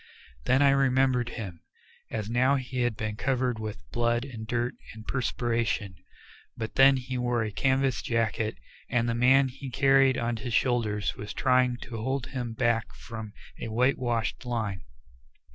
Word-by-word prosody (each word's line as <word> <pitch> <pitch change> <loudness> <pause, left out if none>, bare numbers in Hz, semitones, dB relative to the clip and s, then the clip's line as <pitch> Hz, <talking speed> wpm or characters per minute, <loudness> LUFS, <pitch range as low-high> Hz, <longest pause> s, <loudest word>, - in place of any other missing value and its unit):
Then 130 +3 +4
I 140 - +6
remembered 130 -2 +2
him. 95 -7 -6 0.5
As 110 -2 -3
now 130 +4 +3
he 130 -1 -3
had 120 -3 0
been 110 -1 -3
covered 125 -3 0
with 110 -1 -6
blood 120 +1 +1
and 115 -5 -8
dirt 120 +1 -1 0.2
and 110 0 -11
perspiration, 115 -6 -1 0.6
but 110 -1 -4
then 135 0 +6
he 130 0 -4
wore 120 -1 +1
a 105 - -3
canvas 135 +2 +1
jacket 115 - -1 0.3
and 120 -1 +1
the 115 - +1
man 130 +3 +5
he 135 +1 -8
carried 135 0 +4
on 120 0 -1
his 115 0 -3
shoulders 110 -5 +1
was 105 - -6
trying 125 -2 +3
to 115 -3 -6
hold 130 +1 -1
him 120 -3 -3
back 115 0 0
from 110 -3 -8 0.3
a - - -4
white 125 +5 +2
washed 120 -2 -1
line. 110 -7 -2
120 Hz, 160 wpm, -28 LUFS, 115-130 Hz, 0.6 s, I